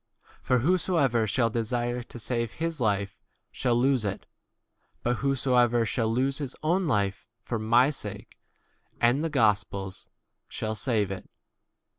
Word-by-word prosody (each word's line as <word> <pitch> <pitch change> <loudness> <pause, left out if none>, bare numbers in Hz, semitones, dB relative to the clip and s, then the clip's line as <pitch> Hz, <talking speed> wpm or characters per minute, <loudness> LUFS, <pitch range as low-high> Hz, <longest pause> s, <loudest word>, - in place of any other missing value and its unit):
For 125 - +2
whoso 180 +1 +2
ever 120 -7 +2
shall 115 +1 +1
desire 120 +2 -1
to 120 - -11
save 115 -1 -2
his 165 -1 -3
life 100 -2 0 0.3
shall 120 -2 0
lose 130 0 +2
it, 100 -2 -3 0.8
but 120 0 +1
whosoever 125 -4 +2
shall 115 +1 0
c 115 - 0
lose 135 +1 0
his 140 -3 -5
own 175 +4 +2
d - - -2
life 100 -7 0 0.2
for 115 -2 -3
my 120 +6 +4
sake 145 - -8 0.6
and 120 +6 +3
the 165 - 0
gospel's 100 -7 0
e - - -41 0.4
shall 110 0 -3
save 105 -2 0
it. 95 -1 -7
120 Hz, 155 wpm, -27 LUFS, 110-135 Hz, 0.8 s, my